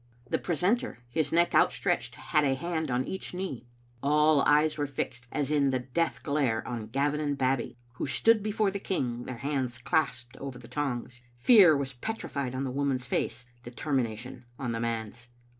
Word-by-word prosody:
The - - 0
precentor, 200 - 0
his 150 +1 0
neck 170 +1 +3
outstretched, - - +2
had 150 - +1
a 135 -2 +2
hand 160 +1 -2
on 125 +1 0
each 190 -1 -5
knee. 160 -10 -5 0.3
All 150 +1 +4
eyes 150 +1 +4
were 145 -1 -1
fixed, 125 -2 -4
as 145 -1 -1
in 145 -2 +3
the 130 - +1
death 130 +7 -2
glare, 140 -7 0
on 115 -3 -4
Gavin 140 +5 0
and 145 -2 -1
Babbie, 130 -2 0 0.2
who - - -2
stood 225 +10 +4
before 210 -1 +1
the 200 - -4
king, 125 -11 -2
their 125 - -6
hands 135 -3 -2
clasped 125 -2 -1
over 135 -2 -6
the 125 -1 -12
tongs. 125 -3 -3 0.2
Pear 190 - +8
was 135 -1 -3
petrified 140 - -4
on 130 - -1
the 130 - -2
woman's 135 -2 -1
face, 125 - -2 0.2
determination 125 -1 -3
on 125 -3 -3
the 115 - -2
man's. 115 0 -3
135 Hz, 175 wpm, -29 LUFS, 125-155 Hz, 0.3 s, Pear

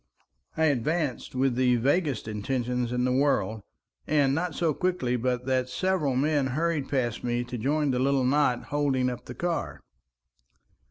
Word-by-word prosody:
I 160 - +3
advanced 145 0 -1
with 130 0 +2
the 125 0 +3
vaguest 140 0 0
intentions 120 +3 -2
in 125 0 0
the 130 - +1
world, 130 -5 +1 0.5
and 140 -3 +3
not 165 +1 -2
so 165 -3 +1
quickly 175 -8 0
but 125 0 -1
that 130 -1 0
several 165 -3 0
men 145 0 +2
hurried 155 +1 -1
past 120 -4 -1
me 120 0 0
to 125 +1 -7
join 145 +5 0
the 125 - 0
little 135 0 +2
knot 130 -2 +2
holding 135 -3 +1
up 125 - -8
the 125 - -8
car. 170 -3 -2
130 Hz, 160 wpm, -27 LUFS, 125-150 Hz, 0.5 s, I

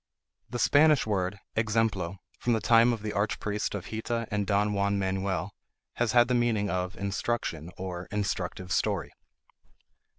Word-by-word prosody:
The 120 - -3
Spanish 150 +3 +5
word 100 -2 -1 0.2
exemplo, 110 -5 0 0.2
from 120 - +1
the 110 - +2
time 115 +2 +5
of 115 -3 -3
the 105 - -3
archpriest 105 0 -1
of 95 -3 -6
Hita 115 +1 -2
and 105 -1 -1
Don 105 0 +2
Juan 100 0 +1
Manuel, 95 0 -1 0.4
has 120 -2 +1
had 120 0 +6
the 125 - +1
meaning 115 -4 +1
of 90 +1 -2
instruction, 100 -4 -2
or 90 -1 -5
instructive 95 -3 -3
story. 95 -4 0
105 Hz, 145 wpm, -28 LUFS, 95-115 Hz, 0.4 s, had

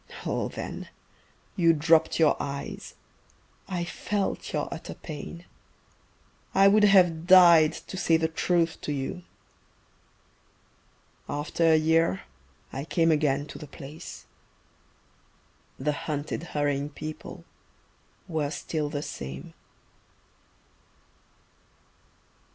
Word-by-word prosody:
Oh - - -1
then - - -7 0.7
You 170 -3 +4
dropped 160 +1 +3
your 155 -2 +5
eyes. 140 0 -6 0.7
I 180 -3 -2
felt 200 +3 -3
your - - -1
utter - - -8
pain. 165 +3 -8 1.1
I 195 - +7
would 210 +1 +6
have 175 -4 +4
died 170 -4 +8
to 190 - -7
say 165 -3 +3
the 160 0 +1
truth 165 +1 0
to - - -3
you. 145 +6 -3 2.1
After 145 +3 -1
a 160 - +6
year 165 +4 +2 0.5
I 135 - -4
came 165 +1 +2
again 145 -2 +1
to - - -10
the 150 - -9
place 145 +3 -10 1.5
The 150 +3 0
hunted 150 0 -4 0.2
hurrying 145 0 0
people 155 +1 -8 0.8
were 155 -5 -1
still 155 0 -3
the 145 -1 -4
same.... 65 - -7
160 Hz, 100 wpm, -27 LUFS, 145-170 Hz, 2.1 s, died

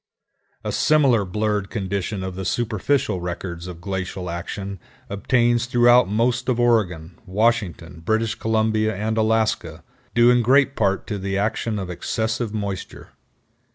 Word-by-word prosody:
A - - -2
similar 135 -8 +3
blurred 105 +1 -1
condition 100 -1 -3
of 95 0 -4
the 95 +1 -5
superficial 115 -1 0
records 85 0 -5
of 90 -2 -8
glacial 95 -1 -4
action 95 +3 -5 0.3
obtains 120 +3 +1
throughout 120 -3 +5
most 120 +4 0
of 120 -2 +1
Oregon, 90 -9 +1
Washington, 105 -5 0
British 110 +4 +1
Columbia, 110 -1 0
and 110 +2 -2
Alaska, 110 0 0 0.3
due 120 +1 +6
in 125 0 +4
great 135 +3 +3
part 100 -3 0
to 105 - -4
the 95 +1 -2
action 110 +1 -1
of 95 -3 -4
excessive 110 +5 -2
moisture. 100 -3 -5
110 Hz, 135 wpm, -22 LUFS, 95-120 Hz, 0.3 s, due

